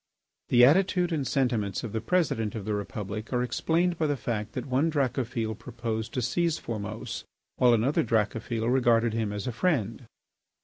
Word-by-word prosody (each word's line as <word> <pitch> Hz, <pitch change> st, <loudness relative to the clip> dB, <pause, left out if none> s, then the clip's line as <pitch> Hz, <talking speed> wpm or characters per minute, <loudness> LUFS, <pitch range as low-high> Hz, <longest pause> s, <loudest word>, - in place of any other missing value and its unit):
The 120 Hz, 0 st, +7 dB
attitude 180 Hz, +4 st, +3 dB
and 140 Hz, -5 st, -1 dB
sentiments 120 Hz, -7 st, 0 dB
of 115 Hz, -, -4 dB
the 110 Hz, -, -1 dB
President 115 Hz, -, 0 dB
of 105 Hz, -3 st, -5 dB
the 105 Hz, -, -1 dB
Republic 105 Hz, +1 st, -5 dB
are 125 Hz, -1 st, +1 dB
explained 165 Hz, +8 st, 0 dB
by 155 Hz, -, +2 dB
the 145 Hz, -1 st, 0 dB
fact 110 Hz, -2 st, -3 dB
that -, -, -4 dB
one 135 Hz, +4 st, +1 dB
Dracophil 125 Hz, -6 st, -1 dB
proposed 110 Hz, 0 st, -4 dB
to 125 Hz, -, 0 dB
seize 165 Hz, +7 st, +1 dB
Formose 105 Hz, -1 st, -5 dB, 0.3 s
while 120 Hz, -2 st, +5 dB
another 135 Hz, +9 st, +2 dB
Dracophil 115 Hz, 0 st, 0 dB
regarded 120 Hz, -3 st, +3 dB
him 110 Hz, -2 st, -1 dB
as 105 Hz, -1 st, -4 dB
a 125 Hz, -, -1 dB
friend. 120 Hz, -, -1 dB
120 Hz, 170 wpm, -28 LUFS, 110-135 Hz, 0.3 s, The